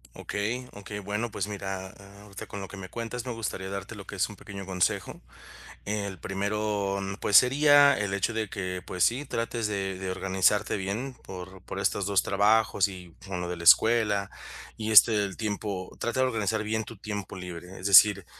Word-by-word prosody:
Okey, 115 +5 -3
okey. 105 +1 -7
Bueno, 105 +4 -3
pues 100 -3 -3
mira, 95 -2 -5
a 100 +1 -15
ahorita 100 -2 -9
con 100 - -7
lo 95 - -6
que 100 - -10
me 95 -1 -8
cuentas 120 +1 -5
me - - -2
gustaría 105 -4 -4
darte 100 +2 -6
lo 100 -2 -10
que - - -7
es 95 - +1
un 105 - -11
pequeño 100 -2 -9
consejo. 90 -2 -1 0.6
El 100 -2 -3
primero, 100 +1 -2 0.2
pues, 105 - +4
sería 145 +3 +6
el 100 -2 -2
hecho 100 +3 0
de 110 -2 -2
que, 90 -2 -4
pues, 90 - 0
sí, 130 +5 +1
trates 115 -4 -2
de 95 -2 -3
de 95 0 -4
organizarte 95 +3 +1
bien 105 +8 -4
por, 95 0 -9
por 95 - -6
estos 100 0 0
2 100 -2 +2
trabajos 105 0 +3
y 90 -3 -11
con 90 -2 -4
lo 90 - -4
de 90 - -4
la 85 - -8
escuela 105 +1 +5 0.5
y, 110 0 -3
este, 110 +1 +8
el 95 -2 -6
tiempo 100 -3 -4
trata 120 +2 -1
de 130 - +4
organizar 110 -3 -1
bien 110 +1 -1
tu 115 - -10
tiempo 105 -1 -6
libre. 90 0 -8
Es 90 - -5
decir, 100 -1 +7
100 Hz, 195 wpm, -27 LUFS, 95-110 Hz, 0.6 s, este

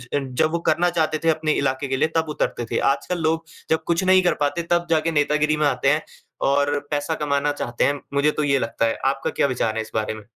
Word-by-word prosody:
जब 140 +2 0
वो 170 - -1
करना 175 +1 +3
चाहते 160 -2 0
थे 165 - +3
अपने 155 -1 +1
इलाके 135 0 -1
के 135 0 -1
लिए 145 - +2
तब 160 -1 0
उतरते 135 -5 -2
थे। - - 0
आजकल 175 +5 -3
लोग 160 +1 0 0.2
जब 160 - +1
कुछ 170 +2 +1
नहीं 185 0 +5
कर 175 - +3
पाते 145 +4 0
तब 175 0 +2
जाके 165 0 +2
नेतागिरी 150 0 +1
में 150 - +1
आते 135 0 +1
हैं 150 +1 +1 0.5
और 145 +1 +2
पैसा 145 +2 -1
कमाना 145 0 +1
चाहते 120 -4 -2
हैं। 145 0 0
मुझे 140 +2 +3
तो 150 - -2
ये 140 -2 +2
लगता 115 -1 -1
है 115 - -1
आपका 135 0 0
क्या - - +1
विचार 120 -4 -1
है 110 - -1
इस 110 0 -9
बारे 110 0 -1
में? 110 -1 -10
145 Hz, 245 wpm, -22 LUFS, 135-160 Hz, 0.5 s, नहीं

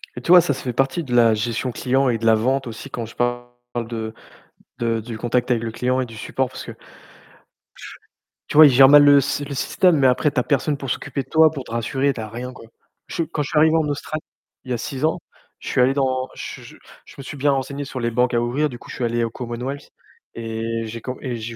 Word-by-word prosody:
Et - - -6
tu - - -9
vois, 180 -1 +10
ça, 145 - 0
ça - - -8
fait 125 - -3
partie 135 +7 0
de 125 -3 -3
la 115 -2 +5
gestion 115 +3 -2
client 130 +2 +1
et 115 - +1
de 115 - -5
la 110 - +6
vente 130 +5 0
aussi 115 +5 -8
quand 120 -3 -5
je 115 - -13
parle 120 0 -1 0.4
de 110 -1 -5 0.7
de 115 -1 0
du 115 0 -7
contact 120 +2 0
avec 120 -2 +1
le 115 - -3
client 125 +3 -1
et 130 - 0
du 115 -2 -12
support, 130 +4 -2
parce - - -8
que - - -7
tu - - -14 1.7
tu - - -2
vois, 155 - +11
ils - - +8
gèrent 135 +1 +7
mal 145 0 +8
le 145 -1 +7
sy 145 +2 -2
le 140 - -6
système, 175 +5 +2
mais 135 - +2
après, 130 +4 +2
tu 135 - -1
as - - +1
personne 145 +1 0
pour 135 -1 -6
s'occuper 140 +1 -3
de - - -28
toi, 160 0 +6
pour 140 -4 -6
te - - -13
rassurer, 130 +4 0
tu 120 - -9
as 110 - -5
rien, 120 +3 -6
quoi. 125 - -13 0.4
Je - - -8
suis 165 -2 -2
quand 150 - -2
je - - -6
suis 155 - -1
arrivé 160 +1 +5
en 160 -2 +2
Australie, 145 +2 -4 0.4
il 130 - -7
y - - +2
a - - -1
6 135 +5 -3
ans, 160 - 0 0.4
je - - -7
suis - - 0
allé 130 +2 +4
dans 130 -2 0
je - - -7
je - - -13 0.3
je - - -15
me 140 - -8
suis 145 - -8
bien 145 +1 +2
renseigné 140 +1 -3
sur 135 - -6
les 120 0 -1
banques 125 +2 +1
à 120 - +2
ouvrir, 130 +6 0
du 120 - -8
coup, - - -15
je - - -7
suis - - -4
allé 120 0 0
au 115 - -1
Commonwealth, 125 +4 -6 0.5
et 115 0 -3
j'ai 115 +1 -7
co 125 +2 -5
et 125 -3 -4
j'ai 115 +1 -6
125 Hz, 275 wpm, -21 LUFS, 115-140 Hz, 1.7 s, vois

